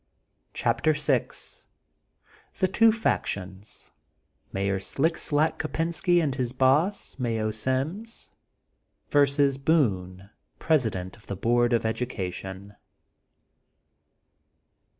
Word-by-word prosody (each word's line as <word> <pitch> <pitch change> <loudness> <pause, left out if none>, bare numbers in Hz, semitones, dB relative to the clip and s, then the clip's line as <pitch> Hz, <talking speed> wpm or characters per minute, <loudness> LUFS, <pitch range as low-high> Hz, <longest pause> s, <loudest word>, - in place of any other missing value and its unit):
CHAPTEE 155 - +2
VI 145 -4 +1 1.3
THB 185 0 0
TWO 225 +2 +6
FACTIONS:— 100 - -3 0.6
MAYOR 100 0 -1
SLICK 160 - 0
SLACK 150 +2 0
KOPBNSKT 165 +2 +1
AND 140 -4 0
HIS 125 -2 -2
BOSS. 140 +7 +1
MAYO 115 -3 -1
SIMS; 135 - -3 0.8
VERSUS 140 -1 +3
BOONB, 100 - +1 0.4
PRESIDENT 110 - 0
OF 105 - -21
THB 100 - -6
BOARD 120 +1 +3
OF 115 -1 +1
EDUCATION. 100 -4 -4
130 Hz, 90 wpm, -26 LUFS, 105-155 Hz, 1.3 s, TWO